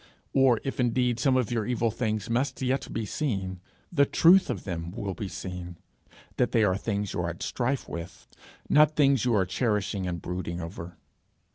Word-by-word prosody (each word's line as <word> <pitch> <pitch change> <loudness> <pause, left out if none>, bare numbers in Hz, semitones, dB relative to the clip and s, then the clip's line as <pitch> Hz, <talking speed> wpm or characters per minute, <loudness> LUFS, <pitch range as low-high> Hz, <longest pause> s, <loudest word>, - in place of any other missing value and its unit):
Or 130 -4 +4
if 135 - -4
indeed 120 -1 +1
some 130 +1 +3
of 125 -4 0
your 115 -2 0
evil 120 -2 +1
things 110 -2 -2
must 130 +3 -1
yet 130 +1 -1
be 115 - -2
seen, 95 -7 -3 0.3
the 145 -5 +4
truth 185 +3 +5
of - - -3
them 85 -3 -4
will 100 +1 -4
be 100 - -5
seen 90 -1 -7 0.6
that 125 - +1
they 115 - +4
are 95 -3 +3
things 100 -1 -2
you - - -3
are 85 - -1
at 85 - -6
strife 130 +2 -1
with, 85 +1 -8 0.4
not 150 +1 +5
things 135 -4 +3
you 120 -2 +3
are 95 -3 +3
cherishing 100 -2 -1
and 85 -1 -3
brooding 90 0 -4
over. 85 0 -7
110 Hz, 185 wpm, -27 LUFS, 90-125 Hz, 0.6 s, truth